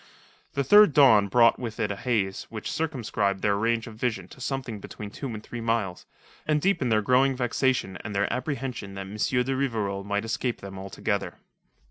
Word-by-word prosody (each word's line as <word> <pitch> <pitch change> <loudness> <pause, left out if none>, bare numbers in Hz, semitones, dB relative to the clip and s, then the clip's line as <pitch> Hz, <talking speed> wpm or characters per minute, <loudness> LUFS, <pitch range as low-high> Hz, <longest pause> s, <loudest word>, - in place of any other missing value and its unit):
The 140 - 0
third 205 +3 +7
dawn 115 -8 +6
brought 115 +3 +4
with 115 -3 -5
it 105 - 0
a - - -3
haze 100 -4 -1
which 110 -2 -5
circumscribed 110 -10 -1
their 100 -1 +3
range 115 +2 0
of 115 -3 -10
vision 110 -6 -2
to 130 - -14
something 130 -5 -3
between 100 +1 -8
two 140 - -6
and 110 -3 -6
three 120 - -7
miles, 115 -5 -1 0.4
and 155 -1 +3
deepened 145 -8 +1
their 110 -1 +3
growing 130 +4 +3
vexation 125 -5 0
and 105 -2 -6
their 100 +1 +1
apprehension 130 -7 -4
that 95 - -5
M. 100 +2 -9
de 125 +4 +1
Rivarol 110 -7 -1
might 100 +1 -2
escape 120 +2 -2
them 95 -1 -8
altogether. 95 0 -3
115 Hz, 185 wpm, -26 LUFS, 100-130 Hz, 0.4 s, third